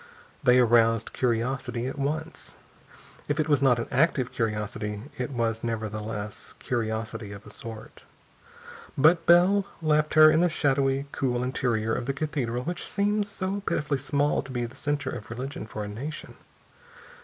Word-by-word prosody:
They 125 -4 +5
aroused 115 -2 +4
curiosity 125 0 -1
at 130 - -3
once. 155 +4 -4 0.7
If 145 +2 -1
it 155 - +1
was 145 -3 +3
not 130 -3 +4
an 115 - -3
active 130 -2 +2
curiosity, 105 -1 -3 0.2
it 125 - -2
was 115 -3 -1
nevertheless 110 -2 -4
curiosity 110 -2 -3
of 100 0 -11
a 105 - -11
sort. 110 0 -9 0.9
But 165 +4 +5
Bell 180 +4 +6 0.2
left 155 -1 +1
her 155 0 +9
in 155 - +3
the 175 +1 +4
shadowy, 135 -3 +1
cool 125 -2 -1
interior 120 -4 0
of 120 - -3
the 140 - 0
cathedral 135 -5 -2
which 175 +4 -4
seems 205 +1 0
so 200 0 -3
pitifully 150 -7 -1
small 145 +2 +1
to 130 - -10
be 120 -1 -1
the 120 - -10
center 145 -2 -2
of 105 - -7
religion 125 0 -5
for 110 -1 -5
a - - -5
nation. 135 +10 -6
130 Hz, 155 wpm, -27 LUFS, 115-150 Hz, 0.9 s, her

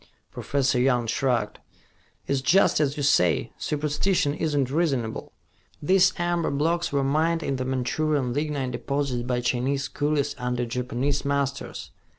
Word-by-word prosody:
Professor 135 -3 0
Young 125 -2 +2
shrugged. 120 -2 -1 0.7
"It - - -5
is 135 -1 +1
just 185 +6 +4
as 145 -1 0
you 145 - -2
say. 90 - +2
Superstition 150 +1 0
is 155 -1 -2
not 135 -2 +1
reasonable. 135 -8 -1 0.5
These 190 +4 +4
amber 175 -1 0
blocks 165 +5 0
were 140 -1 +1
mined 160 +4 +1
in 135 -2 -1
the 130 - -3
Manchurian 130 +1 0
lignite 145 -2 -2
deposits 140 0 -2
by 125 0 -1
Chinese 130 +3 0
coolies 145 -1 -1
under 125 0 -1
Japanese 125 +4 -2
masters. 140 -1 -2
140 Hz, 145 wpm, -25 LUFS, 125-150 Hz, 0.7 s, just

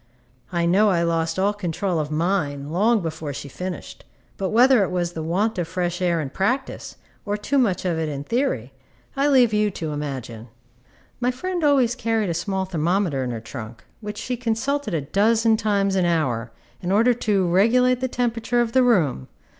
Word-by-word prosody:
I 170 -1 0
know 200 +5 +4
I 170 -3 +2
lost 165 0 0
all 200 +2 +2
control 180 -2 -2
of 150 -1 -2
mine 150 -3 -1
long 215 +6 +2
before 160 -3 -4
she 145 +1 -7
finished; 180 +3 -7 0.3
but 190 -1 -2
whether 245 +1 +5
it 195 - +1
was 175 -1 -2
the 160 - -5
want 185 +6 0
of 170 - -2
fresh 175 +1 -2
air 175 -2 +1
in 140 -4 -4
practice, 250 - -2 0.3
or 205 0 -2
too 275 +7 0
much 200 -7 +1
of 170 -3 0
it 160 -1 -1
in 140 -1 -4
theory, 190 - -1 0.4
I 275 +1 +2
leave 255 -6 +4
you 210 0 +2
to 165 -5 -5
imagine. 130 -6 -5 0.7
My 245 0 +1
friend 350 +7 -3
always 270 -5 +3
carried 225 -5 -1
a - - -1
small 190 +3 -2
thermometer 170 -4 0
in 125 - -3
her 115 -2 -4
trunk, 115 0 -9 0.2
which 210 -1 -7
she 250 - -3
consulted 250 +1 -1
a 155 - 0
dozen 220 +8 +2
times 200 -2 +1
an 185 -2 +2
hour, 125 -9 0 0.3
in 180 0 -2
order 230 +5 +4
to 205 -5 0
regulate 240 +8 +3
the 260 - -1
temperature 240 -1 -1
of 235 -1 +1
the 260 - +4
room. 175 - +2
190 Hz, 190 wpm, -23 LUFS, 160-230 Hz, 0.7 s, whether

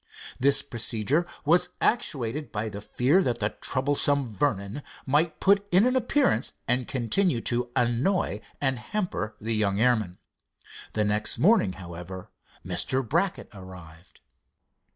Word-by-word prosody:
This 140 +2 +3
procedure 120 - +1 0.2
was 175 +4 +4
actuated 150 - -1
by 110 0 -3
the 100 0 -8
fear 135 - +2
that 125 -9 0
the 105 -2 0
troublesome 140 0 +2
Vernon 105 +1 -2 0.2
might 150 +4 +1
put 200 +1 +2
in 185 +5 +5
an 255 +1 +2
appearance 255 - +1
and 125 0 0
continue 130 - +1
to 120 -1 -1
annoy 120 - 0 0.2
and 135 -3 0
hamper 110 - -3
the 115 +2 -2
young 100 -2 +1
airman. 110 -7 +1 0.8
The 105 -1 +1
next 105 +1 +1
morning, 185 - +3
however, 90 +1 -9 0.3
Mr. 110 +8 0
Brackett 175 - -1
arrived. 90 -3 -13
125 Hz, 130 wpm, -26 LUFS, 105-155 Hz, 0.8 s, in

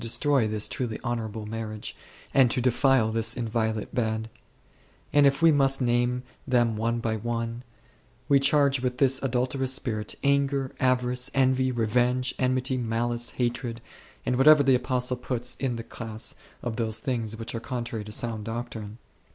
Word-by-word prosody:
destroy 125 +1 +2
this 105 0 -1
truly 120 -4 -4
honourable 110 -3 -3
marriage, 110 -1 -5 0.4
and 130 -3 +5
to 120 - 0
defile 125 -2 +3
this 115 +1 +1
inviolate 110 -2 -2
bed; 110 -2 -1 0.8
and 145 -1 +6
if 140 +4 +1
we 165 - +8
must 135 -2 +3
name 120 0 +1 0.2
them 120 -3 +2
one 115 +2 0
by 115 -1 -1
one, 115 +1 -3 0.7
we 140 -1 +5
charge 140 -1 +3
with 125 0 -2
this 135 -1 +3
adulterous 130 +1 0
spirit 110 -5 -2
anger, 140 -1 +1
avarice, 125 0 +1
envy, 130 -1 +3
revenge, 125 +2 +1
enmity, 130 0 +1
malice, 120 0 -1
hatred, 120 -1 -2 0.5
and 125 - +1
whatever 150 +2 +7
the 135 -1 +4
Apostle 125 0 0
puts 125 -1 -2
in 130 -3 -1
the 115 - -5
class 110 -1 -4 0.3
of 120 -2 -3
those 110 -2 -1
things 115 -4 -3
which 115 0 -5
are 115 - -3
contrary 120 -3 -4
to 105 - -9
sound 110 0 -2
doctrine. 115 -2 -6
120 Hz, 155 wpm, -26 LUFS, 115-130 Hz, 0.8 s, we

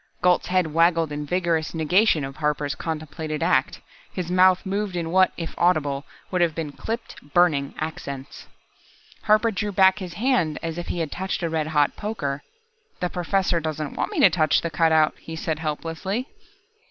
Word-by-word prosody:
Gault's 180 -1 +3
head 180 -4 +1
wagged 165 -1 +3
in 145 0 -4
vigorous 170 -2 0
negation 165 0 +3
of 135 +1 -8
Harper's 150 -2 -1
contemplated 155 0 -4
act. 145 -6 +1 0.3
His 180 -2 -4
mouth 185 +1 +4
moved 200 0 -2
in 165 -2 -2
what, 185 +1 +4
if 165 -2 -5
audible, 145 -5 +1 0.3
would 180 -1 +1
have 165 -3 +2
been 160 -3 -4
clipped, 225 +10 -6
burning 155 -6 +3
accents. 140 -3 -6 0.8
Harper 215 +2 +4
drew 210 0 -2
back 190 +1 +4
his 180 -3 -6
hand 215 - +1
as 165 +1 -3
if 175 - -6
he 170 - -2
had 155 -3 -3
touched 190 0 -3
a 170 - 0
red 155 -1 -1
hot 150 -2 +2
poker. 150 -10 -3 0.6
"The 180 -1 -2
Professor 180 0 0
doesn't 155 -2 -4
want - - -2
me 395 - -2
to - - +7
touch 155 -3 +3
the 170 - -3
cutout," 160 -2 +3
he 160 - -8
said 160 -1 -3
helplessly. 165 - -3
165 Hz, 175 wpm, -24 LUFS, 155-185 Hz, 0.8 s, to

